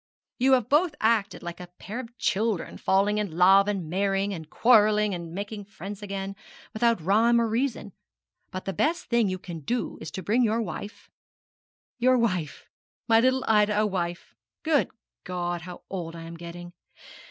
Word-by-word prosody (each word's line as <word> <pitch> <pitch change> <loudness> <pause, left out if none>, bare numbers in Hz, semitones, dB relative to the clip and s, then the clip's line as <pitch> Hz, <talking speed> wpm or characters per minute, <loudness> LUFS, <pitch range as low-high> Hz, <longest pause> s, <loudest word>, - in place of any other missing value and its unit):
You 265 +2 +4
have 250 -4 +3
both 300 +3 +3
acted 220 -4 +1
like 175 0 -6
a 180 - -8
pair 215 +5 -6
of 240 -1 -9
children, 210 -3 -1
falling 200 +2 +2
in 190 -6 -3
love 195 +2 +6
and 195 -5 -2
marrying, 195 +3 0
and 160 -4 -8
quarrelling, 210 -2 +4
and 170 -2 -6
making 205 +3 -6
friends 200 +1 -8
again, 195 -1 -5 0.4
without 230 0 +2
rhyme 220 +8 +3
or 230 - +2
reason; 225 -3 -2 0.6
but 185 - -6
the 195 - -2
best 330 - 0
thing 235 -4 +3
you 185 - -2
can 175 -3 -8
do 235 - -3
is - - -6
to 190 - -5
bring 225 +8 +2
your 225 -1 +2
wife 205 0 -8 0.9
your 255 +1 +4
wife? 185 - -1 0.4
my 225 -1 +6
little 260 +2 +2
Ida 210 -1 +3
a - - +2
wife? 175 -4 -3 0.3
Good 310 -3 +2 0.3
God, 175 -1 -3
how 180 +1 -10
old 170 -3 -5
I 165 - -8
am 165 +1 -8
getting! 175 +1 -9
205 Hz, 175 wpm, -26 LUFS, 180-230 Hz, 0.9 s, love